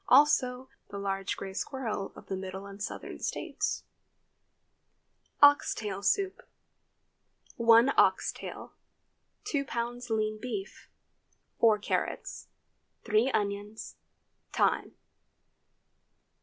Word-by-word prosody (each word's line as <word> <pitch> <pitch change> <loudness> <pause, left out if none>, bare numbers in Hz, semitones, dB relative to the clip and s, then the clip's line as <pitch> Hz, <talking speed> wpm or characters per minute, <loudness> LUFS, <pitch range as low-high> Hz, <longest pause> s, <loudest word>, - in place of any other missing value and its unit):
Also, 260 -2 +4 0.2
the 200 - -6
large 195 -1 -2
gray 195 -1 -6
squirrel 220 -3 -3
of - - -12
the 190 - -3
Middle 190 +1 -6
and 200 0 -10
Southern - - -5
States. - - -2 1.6
OX 285 0 +7
TAIL 200 -3 -4
SOUP. 380 - +1 1.2
1 230 +2 +6
ox - - +4
tail. - - -9 0.7
2 285 -2 -1
lbs. 240 -1 -4
lean 215 -1 0
beef. 210 -6 -6 0.7
4 220 -2 +5
carrots. 210 - -3 0.6
3 225 +3 +3
onions. 205 -1 -3 0.5
Thyme. - - +1
215 Hz, 95 wpm, -30 LUFS, 200-250 Hz, 1.6 s, OX